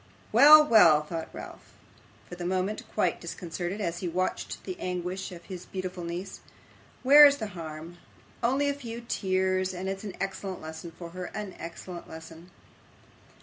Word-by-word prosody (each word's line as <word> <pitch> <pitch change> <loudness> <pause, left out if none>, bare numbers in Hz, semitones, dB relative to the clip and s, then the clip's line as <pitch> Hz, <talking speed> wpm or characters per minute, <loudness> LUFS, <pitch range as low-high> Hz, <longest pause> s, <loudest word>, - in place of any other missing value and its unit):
Well! 300 +6 +9
Well!' 165 - +6
thought 165 +1 -5
Ralph - - -11 0.5
for - - -11
the 175 0 -6
moment 185 +3 -2
quite 185 -5 0
disconcerted, 175 +3 -5
as 170 -4 -2
he 180 - -3
watched 185 +2 -3
the 370 - -5
anguish 180 - -4
of 170 -1 -10
his 180 -1 -9
beautiful 185 -1 -5
niece. 175 +3 -6 0.6
'Where 290 +3 +10
is 285 0 +1
the 220 -4 -4
harm? 165 0 -8 0.4
only 265 +4 +2
a 285 - +1
few 240 -4 -7
tears; 185 -3 0
and 185 +2 -5
it's 195 +1 -4
an 200 -3 -7
excellent 195 0 -4
lesson 160 +2 -8
for 170 -1 -8
her, 185 +1 -6
an 205 -3 -5
excellent 170 +1 -8
lesson. 160 +2 -11
185 Hz, 160 wpm, -28 LUFS, 170-210 Hz, 0.6 s, Where